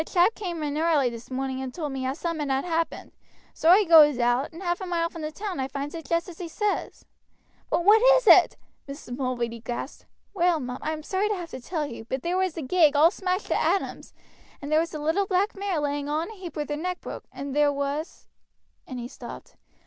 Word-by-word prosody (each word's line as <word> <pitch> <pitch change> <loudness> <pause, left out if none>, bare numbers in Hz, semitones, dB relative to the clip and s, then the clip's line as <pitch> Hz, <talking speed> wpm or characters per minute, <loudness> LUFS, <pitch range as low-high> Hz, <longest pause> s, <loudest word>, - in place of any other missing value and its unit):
A - - -3
chap 355 +6 +3
came 350 -7 -5
in 295 0 -2
early 310 -6 +2
this 230 0 -10
morning 265 0 -3
and 260 -1 -5
told 300 0 -4
me 260 -1 -3
as 265 +2 -3
summat 325 -4 -3
had 270 +3 0
happened, 330 -1 -2 0.4
so 320 - +1
I 385 +4 +7
goes 310 -6 +7
out, 245 +4 +1
and 335 +4 -10
half 350 +1 -1
a 375 - -4
mile 335 -1 -1
from 330 - -8
the 305 0 -4
town 390 0 -5
I 265 - -1
finds 280 +2 -5
it 325 -2 -7
just 335 +1 +1
as 345 -3 -11
he 355 - -5
says." 415 +5 -3 0.6
"But 345 - 0
what 430 +2 +7 0.2
is - - -2
it?" - - +7 0.3
Mrs. 275 -3 -7
Mulready 240 -3 -2
gasped. 240 +4 -6 0.3
"Well, 350 -4 +2
mum, 250 -1 -5
I 310 - -2
am 310 -1 -5
sorry 390 +5 0
to 420 - 0
have 345 -3 -7
to - - -7
tell 310 +4 -3
you, 230 -5 -8
but 265 +2 -4
there 345 +1 -1
was 375 -2 +1
the 325 - -4
gig 305 +1 +4
all 315 +4 +6
smashed 375 0 -2
to - - +1
atoms, 390 - -1 0.5
and 290 +1 -7
there 310 - +5
was 330 +1 -1
the 310 - -6
little 320 +7 0
black 390 +3 +1
mare 390 -4 -2
lying 290 0 -2
all 305 +1 0
in 340 - -5
a - - -10
heap 370 -4 -9
with 300 -2 -3
her - - 0
neck 360 +3 -3
broke, - - -8
and 275 0 -6
there 295 -1 +4
was 285 +3 -4 0.3
" - - -45
and 255 - -6
he 240 0 -5
stopped. - - -11
315 Hz, 245 wpm, -26 LUFS, 275-355 Hz, 0.6 s, I